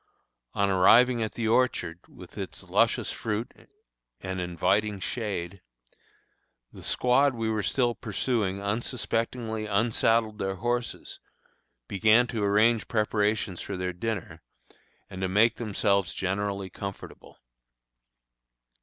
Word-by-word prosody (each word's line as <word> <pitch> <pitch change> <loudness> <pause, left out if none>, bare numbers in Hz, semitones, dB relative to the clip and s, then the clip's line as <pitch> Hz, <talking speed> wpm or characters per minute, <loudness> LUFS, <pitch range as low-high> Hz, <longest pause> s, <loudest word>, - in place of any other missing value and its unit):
On 100 - +2
arriving 115 +6 +5
at 110 - -2
the 115 -2 -2
orchard, 110 -8 +1
with - - -14
its - - -6
luscious - - +1
fruit 110 +1 -3 0.7
and 95 -1 -4
inviting 95 +4 0
shade, 95 -4 -4 1.1
the - - -12
squad 130 +2 +3
we 115 -1 -1
were 110 -1 0
still 120 +3 +1
pursuing 105 -4 -1
unsuspectingly 110 +1 -2
unsaddled 110 +1 +1
their 95 0 -2
horses, 120 +4 -3 0.7
began 110 +4 +4
to 115 -3 -3
arrange 105 +2 +3
preparations 105 -3 0
for 100 - -5
their 90 0 -2
dinner, 110 +1 -4 0.7
and 95 - -8
to 95 - 0
make 110 +4 +3
themselves 100 -3 0
generally 100 0 -2
comfortable. 100 +1 -9
105 Hz, 110 wpm, -27 LUFS, 95-115 Hz, 1.1 s, arriving